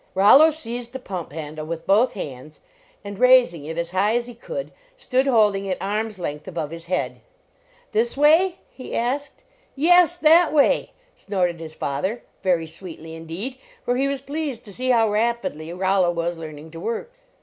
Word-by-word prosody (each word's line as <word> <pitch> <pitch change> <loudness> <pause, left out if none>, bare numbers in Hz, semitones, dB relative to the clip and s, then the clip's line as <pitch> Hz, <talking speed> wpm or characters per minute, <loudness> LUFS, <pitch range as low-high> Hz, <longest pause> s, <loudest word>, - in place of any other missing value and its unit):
Rollo 215 +12 +7
seized 245 -5 -3
the 265 - -5
pump 185 - -6
handle 155 0 -6
with 165 0 -5
both 215 +6 +3
54 200 - -3
LEARNING 135 - -8
TO - - -13
WORK - - -12
hands, - - -24 0.4
and, 200 0 -8
raising 250 - +5
it 160 +2 -6
as 170 0 -2
high 200 +4 +2
as 240 0 0
he 245 - -9
could, - - -6 0.3
stood 265 - 0
holding 210 -6 +3
it 185 - -1
arm 210 +3 -1
s 215 -3 -8
length 150 -3 -5
above 165 -4 -4
his 165 0 -8
head. 125 -9 -2 0.3
" - - -33
This 235 +4 0
way?" 325 +6 +4
he 255 - -8
asked. 270 +5 -2 0.3
"Yes, 350 +4 +5
that 330 +1 +5
way!" 295 -2 +3 0.3
snorted 180 -4 -1
his 160 -1 -9
father, 185 - -3 0.2
very 175 -3 +1
sweetly, 160 -1 -9
indeed, 170 +11 -6 0.3
for 245 - +1
he 270 +2 +1
was 275 -1 -2
pleased 285 -3 -4
to 205 - -10
see 255 +5 -3
how 230 -3 +4
rapidly 210 -7 -1
Rollo 185 0 +2
was 170 0 -1
learning 155 -1 -9
to 165 - -9
work. 230 - -4
205 Hz, 195 wpm, -23 LUFS, 165-255 Hz, 0.4 s, Rollo